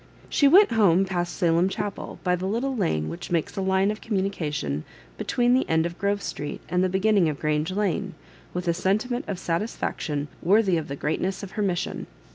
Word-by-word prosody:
She 285 - +4
went 380 - +7
home 195 -5 +4
past 175 -2 -2
Salem 170 0 +2
Chapel 205 0 -5
by 180 -1 +2
the 180 +1 -3
little 250 +6 -1
lane 80 - 0
which 80 +2 -6
makes 170 -3 -1
a 195 - -2
line 190 +1 +2
of 215 - -7
communica 195 -7 -1
tion 75 - -2 0.3
between 245 - +1
the 260 - +2
end 160 0 +3
of 170 +1 -5
G 200 - 0
rove 200 -1 0
Street 145 - -5
and 180 0 +1
the 185 - +2
beginning 190 -2 +3
of 150 - -4
Grange 155 0 0
Lane, 195 -1 -1 0.4
with 180 0 -4
a 170 - +3
sentiment 215 +8 0
of 200 - -3
satisfaction 165 -5 -2
worthy 190 -1 +3
the 140 -3 -5
greatness 185 +7 -2
of 195 - -7
her 210 - -3
mission. 185 -4 -2
185 Hz, 200 wpm, -25 LUFS, 165-205 Hz, 0.4 s, went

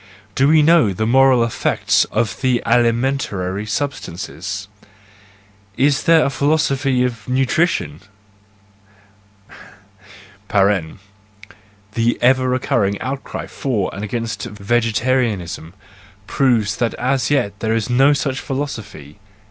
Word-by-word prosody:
Do 135 +6 +2
we 155 0 +5
know 155 - +4
the 110 +4 -2
moral 130 0 +4
effects 115 - +1
of 110 -3 -2
the 130 -2 +1
alimentary 115 -5 0
substances? 100 - -5 1.1
Is 140 +3 +2
there 165 -2 +5
a 140 - 0
philosophy 140 -3 +1
of 115 -4 -4
nutrition? 130 - 0 2.5
(The 100 +3 -3
ever 130 +1 +3
recurring 120 -6 0
outcry 135 +3 -5
for 110 -9 -3
and 100 - -6
against 110 -1 -4
vegetarianism 110 -4 -1 0.5
proves 110 -4 +1
that 120 -1 -1
as 130 -1 0
yet 100 -9 0
there 110 0 0
is 115 -2 -1
no 135 +4 +4
such 135 -2 -2
philosophy!) 105 - -6
115 Hz, 100 wpm, -19 LUFS, 100-135 Hz, 2.5 s, we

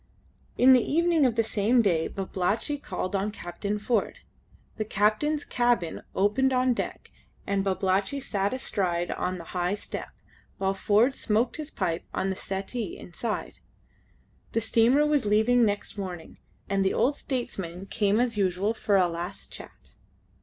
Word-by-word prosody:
In 260 +1 +7
the 250 - +6
evening 330 +1 +3
of 235 - -1
the 230 - +3
same 225 +3 +2
day 170 -6 +2
Babalatchi 195 +9 -2
called 185 +2 -3
on 195 +2 0
Captain 200 +1 -4
Ford. 210 0 0 0.6
The 215 - 0
captain's 215 +9 +1
cabin 240 -9 0
opened 225 +7 +2
on 255 0 +3
deck, - - -5 0.3
and 200 -1 0
Babalatchi 195 +6 0
sat 200 -6 -1
astride 180 -9 -1
on 185 0 -2
the 170 - -8
high 180 +2 0
step, 210 - -6 0.5
while 195 0 0
Ford 215 +6 +3
smoked 230 0 0
his 310 -1 -5
pipe 165 - -2
on 190 - 0
the - - -3
settee 195 +3 -4
inside. 215 +5 -5 0.9
The 230 - +1
steamer 235 +6 +4
was 295 -7 +2
leaving 220 +4 +4
next 205 0 -2
morning, 180 -4 -7 0.3
and 195 0 +1
the 190 - +1
old 285 +3 +2
statesman 195 -10 -4
came 205 +1 +1
as 235 -3 +1
usual 195 +3 +1
for 210 -3 +1
a 185 -2 +4
last 175 +2 -6
chat. - - -11
210 Hz, 155 wpm, -27 LUFS, 190-245 Hz, 0.9 s, In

